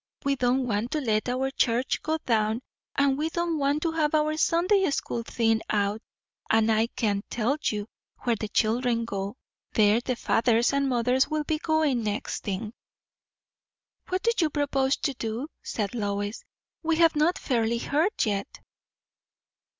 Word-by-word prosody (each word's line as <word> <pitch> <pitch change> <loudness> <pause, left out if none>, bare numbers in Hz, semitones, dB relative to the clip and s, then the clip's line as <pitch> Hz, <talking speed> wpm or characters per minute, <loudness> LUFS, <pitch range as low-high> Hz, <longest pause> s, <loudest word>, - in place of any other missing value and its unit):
We 280 0 +2
don't 255 0 +1
want 220 0 -1
to 310 - +1
let 220 -4 0
our 260 +2 -1
church 245 -1 +1
go 315 +1 -1
down, 220 0 +1 0.3
and 280 0 +2
we 315 +1 0
don't 340 -1 -1
want 285 +2 +1
to 330 - +1
have 315 -1 +1
our 305 0 +2
Sunday 365 +5 +3
school 240 -4 -2
thinned 225 -1 +1
out; 205 +1 0 0.5
and 225 0 +4
I 220 +1 +3
can 205 -4 -1
tell 240 +4 0
you, 210 -1 -1 0.4
where 240 -2 +2
the 215 0 -4
children 230 +2 +1
go, 200 -1 -4 0.4
there 215 +1 +4
the 250 0 -2
fathers 235 +1 +2
and 280 -1 +1
mothers 250 +2 +2
will 310 -1 -1
be 310 +1 -1
going, 315 -6 +1
next 210 -1 -3
thing." 210 +2 -4 1.4
"What 370 0 -1
do 465 - +4
you 320 -4 +3
propose 280 -2 +1
to 280 - -1
do?" 235 +4 -4
said 210 -1 -3
Lois. 205 -1 -3 0.4
"We 330 -1 +1
have 330 -1 +4
not 310 +4 +2
fairly 235 -3 0
heard 315 - +1
yet." 205 +4 -3
250 Hz, 160 wpm, -27 LUFS, 220-300 Hz, 1.4 s, and